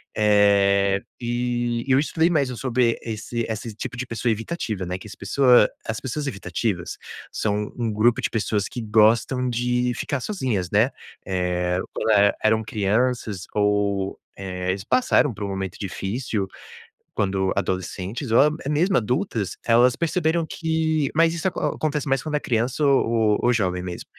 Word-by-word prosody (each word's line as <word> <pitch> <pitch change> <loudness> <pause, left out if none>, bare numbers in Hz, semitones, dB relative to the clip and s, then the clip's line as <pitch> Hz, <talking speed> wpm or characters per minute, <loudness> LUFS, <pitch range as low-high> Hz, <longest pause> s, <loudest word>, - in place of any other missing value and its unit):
eh, 100 -1 +4 0.2
e 120 0 -1
eu 130 0 +4
estudei 160 +3 +2
mais, 145 -6 +1
sobre 125 -2 +1
esse 115 +1 -4
esse 110 0 -4
tipo 120 - -6
de 125 - -3
pessoa 115 0 -1
evitativa, 110 - -3
né, 90 +1 -3
que 110 - -11
as - - -10
pessoas 125 +2 +4 0.2
as 110 - -2
pessoas 140 +3 -4
evitativas 95 -3 -3 0.3
são 105 -1 -1
um 115 -2 -1
grupo 115 +3 +2
de - - 0
pessoas, 105 -3 -1
que 120 - -6
gostam 115 +4 +3
de 125 +1 0
ficar 140 - -2
sozinhas, 125 - -2
né, - - +3 0.4
eh, 90 -1 -1
quando - - -2 0.3
eram 110 +1 +3
crianças 110 -1 -1
ou, 100 -1 0 0.2
eh, 90 -1 -4
eles 95 +1 -2
passaram 145 - +2
por 105 +1 -7
um - - -3
momento 95 -2 -4
difícil, 100 +1 -3 0.7
quando 95 -1 0
adolescentes 95 - -3
ou 140 +6 +5 0.2
mesmo 175 +5 +2
adultas, 120 - -1
elas 120 +1 +5
perceberam 165 -1 0
que 160 -3 0
mas 165 +1 +3
isso 170 +3 -1
acontece 150 -5 -2
mais, 135 -1 +1
quando 150 -1 -2
é - - -1
criança 120 +5 0
ou 115 -6 +3
ou 120 - +3
jovem 90 -5 0
mesmo. 90 -1 -6
115 Hz, 150 wpm, -23 LUFS, 100-130 Hz, 0.7 s, ou